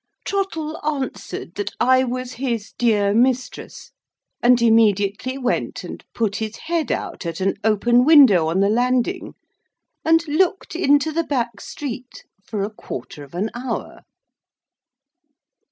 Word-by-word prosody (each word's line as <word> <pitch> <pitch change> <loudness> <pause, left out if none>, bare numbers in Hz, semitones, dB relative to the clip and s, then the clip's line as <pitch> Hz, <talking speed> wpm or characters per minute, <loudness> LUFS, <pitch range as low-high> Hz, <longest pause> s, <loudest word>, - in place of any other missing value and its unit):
Trottle 325 -6 -2
answered 290 -3 -4
that 410 - -4
I 260 +1 +4
was 255 0 -4
his 235 -4 -3
dear 210 -4 +2
mistress, 250 +2 -1 0.5
and 245 0 +5
immediately 220 +1 +2
went 250 -2 -2
and - - -8
put 215 -3 0
his 220 0 -4
head 330 +2 -2
out - - -4
at 165 -2 -4
an 195 +1 0
open 235 +3 +3
window 255 - +7
on 170 +4 +1
the 200 - +3
landing, 245 +1 0 0.7
and 325 +1 +3
looked 345 +4 0
into 290 -2 +3
the 335 +2 0
back 245 -6 -2
street 255 -3 -7 0.2
for 205 -2 -3
a 205 - -3
quarter 150 -7 -8
of 140 +3 -14
an 205 +5 -2
hour. 245 -1 -5
245 Hz, 135 wpm, -21 LUFS, 215-290 Hz, 0.7 s, window